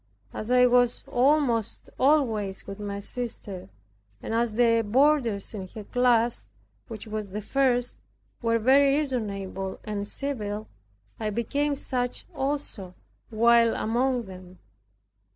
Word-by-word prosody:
As 215 - -6
I 250 0 +6
was 245 -1 +3
almost 250 -4 +1
always 230 -9 +1
with 195 +1 -8
my 200 -1 -4
sister, 200 - -6 0.5
and - - -5
as 230 -1 +1
the 230 0 +4
boarders 235 -2 +2
in 195 -3 -6
her 215 - -6
class, 240 - +2 0.4
which 225 0 -8
was 215 -2 -5
the 205 +3 -4
first, 245 +2 0 0.4
were 230 -1 +2
very 275 +4 +4
reasonable 200 -9 -3
and 205 -1 -4
civil. 215 -7 -4 0.5
I 215 - -1
became 280 +7 -1
such 250 -2 -3
also, 265 -10 -3 0.3
while 230 +1 +4
among 245 +2 0
them. 185 -2 -12
230 Hz, 120 wpm, -26 LUFS, 205-255 Hz, 0.5 s, I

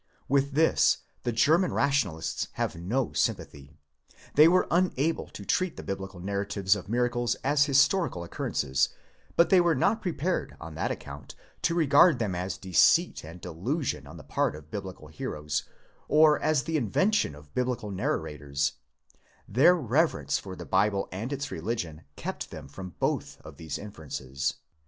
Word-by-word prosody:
With 140 +1 +1
this 160 +3 +4 0.2
the 120 - -1
German 160 - +3
Rational 140 - +1
ists 80 -1 -3
have - - -2
no 110 +10 -2
sympathy. 70 +2 -2 0.6
They 150 +2 +8
were 185 +2 +4
unable 165 -3 +1
to - - -10
treat 185 -3 0
the - - -7
Biblical 95 -1 -5
narratives 100 +1 0
of 95 -1 -8
miracles 120 0 +1
as 145 +1 +3
historical 145 - +2
occur 85 - -4
rences, 65 -1 +1 0.5
but 170 -1 +4
they 185 -2 +7
were 170 -2 +3
not 210 - +2
prepared 180 -1 -2
on 80 -1 -8
that 80 - -2
account - - -7 0.3
to 170 - +1
regard 155 -1 +5
them 105 -6 -1
as 90 +2 -3
deceit 95 -3 +3
and 85 +3 -10
delusion 115 - -3
on - - -11
the - - -11
part - - 0
of 75 +1 -13
Biblical 95 -6 -7
heroes, 75 -1 -4 0.4
or 155 -1 +5
as 155 -4 +2
the 160 0 -1
invention 150 - +1
of 75 0 -16
Biblical 125 -4 -2
narra 75 -5 -2
sors: 70 -1 -1 0.8
their 145 - +5
reverence 150 +1 +1
for 95 -2 -8
the - - -8
Bible 100 +1 +1
and 110 +8 -4
its 140 0 -3
religion 85 -4 -4
kept - - -5
them - - -9
from 90 +5 -9
both - - -2
of - - -12
these 80 -3 -5
inferences. 70 -8 -4
110 Hz, 160 wpm, -28 LUFS, -, 0.8 s, They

